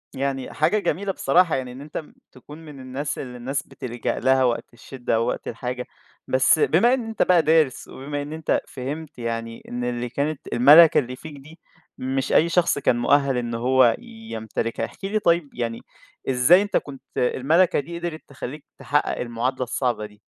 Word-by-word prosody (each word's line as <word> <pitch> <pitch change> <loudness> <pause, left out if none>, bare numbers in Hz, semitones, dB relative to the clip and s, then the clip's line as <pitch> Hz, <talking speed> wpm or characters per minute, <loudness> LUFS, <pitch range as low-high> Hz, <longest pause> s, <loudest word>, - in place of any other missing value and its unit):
يعني، 135 -1 -3
حاجة 205 +8 +2
جميلة 200 0 -1
بصراحة، 180 -2 +3
يعني 130 -2 -4
إن 130 +3 -10
أنت 150 +2 -6 0.3
تكون 150 +5 -13
من 145 -3 -11
الناس 130 +3 -4
اللي 125 -2 -7
الناس 135 +4 -3
بتلجأ 125 -3 -4
لها، 130 +1 +3
وقت 120 -1 -1
الشِدَّة 120 0 -4
أو 115 - +1
وقت - - -3
الحاجة. 125 +2 -4 0.4
بس، 130 +4 +4
بما 230 +13 +4
إن 250 -3 -1
أنت 225 - -4
بقى 180 -2 +4
دارِس، 155 -4 +2
وبما 145 +2 -5
إن 145 +2 -6
أنت 160 -1 0
فهِمت، 140 +3 -7
يعني 115 -1 -4
إن 120 0 -4
اللي 120 0 -2
كانت 140 +3 -3
المَلَكة 150 +7 +8
اللي 125 -1 -4
فيك 155 +3 -10
دي، 155 +5 -15 0.4
مش 130 +1 -2
أي 165 - +4
شخص 170 -4 +2
كان 125 - +2
مؤهَّل 135 +1 +2
إنه 120 -1 -2
هو 125 0 +4
يمتلكها. 225 - -5
احكِ 120 - -15
لي، 210 +2 0
طيب، 170 -6 +2
يعني 115 -1 -3 0.5
إزاي 135 +9 +5
أنت 205 0 0
كنت 135 -2 -6 0.2
المَلَكة 155 +9 +2
دي، 170 +4 -6
قدِرت 170 -2 -5
تخلِّيك 140 +1 -8
تحقِّق 145 +1 0
المعادلة 125 +2 -2
الصعبة 120 -3 -1
دي؟ 105 0 -14
135 Hz, 175 wpm, -23 LUFS, 125-160 Hz, 0.5 s, المَلَكة